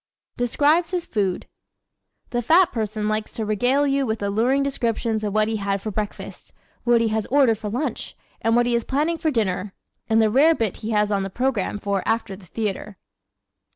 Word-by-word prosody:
Describes 295 +7 +2
His 360 -2 -2
Food 195 -5 -1 0.8
¶ - - -34
The 240 - 0
fat 335 +8 +4
person 215 -2 -2
likes 215 0 -2
to 220 - -3
regale 245 +7 +2
you 275 0 +1
with 220 -4 -2
alluring 235 +7 +1
descriptions 230 -4 -1
of 210 - -1
what 215 +1 +2
he 220 0 -1
had 200 -1 -1
for 215 +2 -5
breakfast, 210 +1 -6 0.3
what 240 -1 +4
he 230 - +1
has 220 0 -1
ordered 255 -6 +3
for 215 -2 -4
lunch 250 +8 -4 0.2
and 225 0 +2
what 240 0 +4
he 240 - 0
is 235 -1 +1
planning 305 +7 -1
for 320 0 +1
dinner 205 -6 -1 0.3
and 225 0 +4
the 220 -1 +3
rarebit 265 - +3
he 220 - -6
has 210 -1 +1
on 200 -1 +1
the 195 - -3
program 235 -2 -1
for 200 -1 -1
after 225 -3 -1
the 185 -2 -16
theater. 210 0 -4
225 Hz, 195 wpm, -23 LUFS, 210-260 Hz, 0.8 s, fat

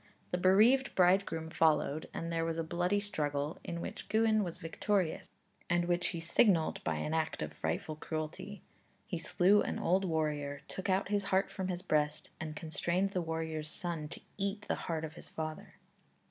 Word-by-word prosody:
The 180 - 0
bereaved 220 +9 +5
bridegroom 180 -3 +3
followed, 155 -2 +2
and 165 0 -4
there 165 0 +1
was 165 0 -1
a 165 - 0
bloody 175 +5 +1
struggle, 150 -7 -2
in 170 -1 -4
which - - -6
Gwyn 220 0 +3
was 175 -2 -4
victorious, 180 +1 -1 0.4
and 175 -1 +3
which 175 0 +1
he 170 - -3
signalized 165 0 +3
by - - 0
an 155 - -2
act 160 - 0
of 75 0 -5
frightful 80 - -2
cruelty; 155 +6 -5 0.4
he 180 -7 -3
slew 190 +5 +4
an - - -2
old 185 +3 +2
warrior, 150 -4 -1
took 190 +1 -4
out 190 0 +2
his 205 -1 +1
heart 190 0 +2
from 190 -2 -3
his 180 -1 -3
breast, 150 0 0
and 155 -1 -5
constrained 170 +4 -1
the 185 - 0
warrior's 160 -2 -3
son 165 -2 -4
to - - -9 0.2
eat 200 +1 -1
the - - +1 0.2
heart 160 -1 -1
of 155 - -8
his - - -11
father. 155 -1 -5
170 Hz, 180 wpm, -33 LUFS, 155-190 Hz, 0.4 s, bereaved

